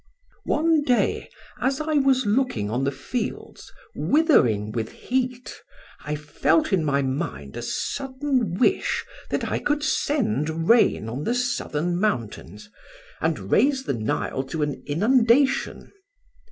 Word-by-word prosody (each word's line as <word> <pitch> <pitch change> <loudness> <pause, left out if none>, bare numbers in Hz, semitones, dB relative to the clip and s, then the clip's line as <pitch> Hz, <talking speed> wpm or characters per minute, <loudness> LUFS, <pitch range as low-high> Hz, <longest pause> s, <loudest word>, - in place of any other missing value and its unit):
"'One 320 0 +2
day 250 -4 0 0.3
as 265 +3 0
I 310 0 -2
was 270 -3 +3
looking 205 - 0
on 125 +4 0
the 140 - +1
fields 220 - -5 0.2
withering 120 - +2
with 110 -1 -3
heat, 250 -1 -3 0.5
I 150 +1 -3
felt 150 +4 +1
in 180 -4 +2
my 140 -2 +1
mind 75 - -4
a - - -5
sudden 260 - -2
wish 315 - +1 0.2
that - - -1
I - - 0
could 295 0 -1
send 210 - 0
rain 230 - +4
on 125 +6 -4
the 235 - 0
southern 175 -9 -1
mountains, 110 - -3 0.5
and 95 +1 -2
raise 270 +2 +3
the - - -2
Nile 115 +3 -2
to 150 +3 -3
an 145 -2 -3
inundation. 240 - +2
210 Hz, 130 wpm, -24 LUFS, -, 0.5 s, rain